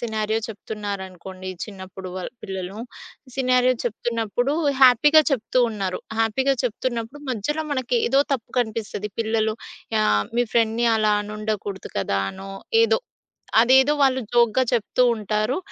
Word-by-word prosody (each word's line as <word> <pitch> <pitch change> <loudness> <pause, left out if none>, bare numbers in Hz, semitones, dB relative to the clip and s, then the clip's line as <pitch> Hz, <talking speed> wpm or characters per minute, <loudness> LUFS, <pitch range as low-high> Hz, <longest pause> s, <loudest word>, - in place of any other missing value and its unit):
Scenario 220 -1 -1
చెప్తున్నారనుకోండి 190 -3 -7 0.2
చిన్నప్పుడు 190 -2 -9
వాళ్ 185 - -5
పిల్లలు, 190 +1 -5 0.6
సినారియో 255 -1 +3
చెప్తున్నప్పుడు 235 +3 -1 0.3
హ్యాపీగా 295 +5 +7
చెప్తూ 255 0 0
ఉన్నారు. 195 -4 -3 0.2
హ్యాపీగా 260 +5 +2
చెప్తున్నప్పుడు 240 +2 -3
మధ్యలో 295 +8 -2
మనకేదో 255 0 +1
తప్పు 250 -5 -3
కనిపిస్తది. 215 -2 -4
పిల్లలు 220 -1 0 0.5
ఆహ్, 105 - +3
మీ 245 - +4
ఫ్రెండ్‌ని 230 0 +2
అలా 215 -1 +2
అనుండకూడదు 210 -2 -4
కదా, 100 0 0
అనో 195 +1 -9 0.3
ఏదో, 460 - +3 0.6
అదేదో 265 +4 +5
వాళ్ళు 265 -1 +4
జోక్‌గా 240 +1 +4
చెప్తూ 240 +2 +2
ఉంటారు. 215 +3 -1
220 Hz, 115 wpm, -23 LUFS, 205-250 Hz, 0.6 s, హ్యాపీగా